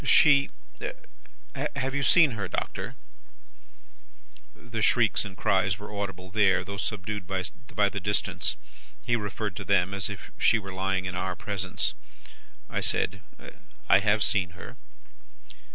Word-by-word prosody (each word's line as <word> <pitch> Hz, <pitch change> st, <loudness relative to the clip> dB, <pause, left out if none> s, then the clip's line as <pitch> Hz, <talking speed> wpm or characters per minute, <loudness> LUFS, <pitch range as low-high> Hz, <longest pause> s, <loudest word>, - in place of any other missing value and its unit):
She 140 Hz, 0 st, +6 dB, 1.3 s
have 135 Hz, +1 st, -1 dB
you 140 Hz, -, 0 dB
seen 155 Hz, +1 st, +6 dB
her, 105 Hz, -5 st, -3 dB
Doctor?' -, -, -4 dB, 1.6 s
"The 115 Hz, -1 st, -6 dB
shrieks 115 Hz, 0 st, +3 dB
and 95 Hz, -2 st, -8 dB
the -, -, -19 dB
cries 95 Hz, 0 st, +2 dB
were 105 Hz, 0 st, -9 dB
audible 95 Hz, -2 st, -5 dB
there, 95 Hz, -3 st, +3 dB
though 100 Hz, +2 st, -6 dB
subdued 105 Hz, -2 st, -4 dB
by 100 Hz, +3 st, -1 dB
the 100 Hz, -, -4 dB
distance. 105 Hz, +1 st, 0 dB, 0.5 s
He 120 Hz, -, +2 dB
referred 105 Hz, -2 st, -3 dB
to 100 Hz, -, -4 dB
them, 95 Hz, -1 st, +2 dB
as 100 Hz, 0 st, +1 dB
if 100 Hz, 0 st, -8 dB
she 115 Hz, -, +5 dB
were 100 Hz, -3 st, -7 dB
lying 95 Hz, 0 st, -1 dB
in 90 Hz, -, -3 dB
our 90 Hz, 0 st, -2 dB
presence. 100 Hz, -4 st, -1 dB, 0.7 s
"I -, -, -2 dB
said, 95 Hz, 0 st, +2 dB, 0.7 s
'I 95 Hz, -, +7 dB
have 105 Hz, +1 st, +2 dB
seen 90 Hz, -4 st, 0 dB
her. -, -, -10 dB
100 Hz, 140 wpm, -27 LUFS, 95-110 Hz, 1.6 s, I